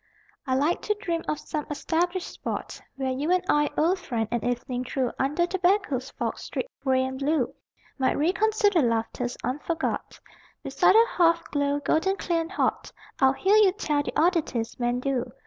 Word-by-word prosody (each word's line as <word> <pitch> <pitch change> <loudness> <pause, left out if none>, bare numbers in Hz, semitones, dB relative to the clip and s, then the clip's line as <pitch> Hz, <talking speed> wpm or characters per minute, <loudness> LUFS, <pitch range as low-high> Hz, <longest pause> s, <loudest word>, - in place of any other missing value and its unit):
I 260 - +1
like 295 +6 +1
to 420 - 0
dream 340 -5 -3
of 300 - 0
some 300 -1 -4
established 345 +4 -1
spot - - -6
Where 265 -1 -2
you 280 +5 -2
and 365 0 +2
I, 295 0 +3
old 350 +5 +2
friend, 230 -9 -2
an 240 -1 -1
evening 245 +1 -2
through 255 -1 -1
Under 295 +6 +1
tobacco's 355 -8 0
fog, - - -4
streaked - - -5
gray 260 -1 +2
and 260 0 -5
blue, 280 -2 0 0.5
Might 260 - +2
reconsider 405 +3 +2
laughters 235 0 -1
unforgot. 295 +6 -3 0.4
Beside - - +3
a 455 +1 +7
hearth 335 -6 +2
glow, 285 0 +1
golden 320 +7 +1
clear 340 -4 -1
and 330 +2 -6
hot, 395 - -1 0.3
I'd 265 0 +4
hear 395 +8 +3
you 405 -4 +5
tell 300 -8 0
the 290 - -3
oddities 310 -10 0
men 240 +1 0
do. 250 -3 -2
295 Hz, 170 wpm, -26 LUFS, 260-355 Hz, 0.5 s, a